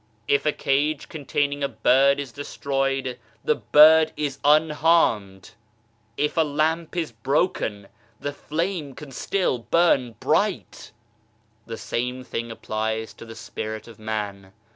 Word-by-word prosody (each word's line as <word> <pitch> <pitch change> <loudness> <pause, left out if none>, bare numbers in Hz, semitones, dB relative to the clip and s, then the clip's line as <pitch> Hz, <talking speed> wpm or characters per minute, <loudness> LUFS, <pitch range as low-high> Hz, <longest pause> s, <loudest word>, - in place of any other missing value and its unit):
If 140 +1 +2
a - - +4
cage 145 +2 0
containing 145 -1 -2
a - - +2
bird 135 +4 +3
is 140 -3 -5
destroyed, 135 -1 -2 0.2
the 465 - +3
bird 155 - +6
is 145 -2 -3
unharmed! 150 - +2 0.7
If 150 +3 -1
a - - +5
lamp 160 +3 0
is 165 -6 -2
broken, 115 - -1 0.3
the 145 - -4
flame 155 -2 -3
can 150 -3 -10
still 155 0 -1
burn 130 -3 +2
bright - - 0
t - - -13 0.7
The 115 -1 -6
same 125 +2 -3
thing 115 -2 -5
applies 110 0 -3
to - - -12
the 115 0 -10
Spirit 110 -1 -6
of 115 -3 -14
man. 100 -3 -5
140 Hz, 135 wpm, -24 LUFS, 115-150 Hz, 0.7 s, bird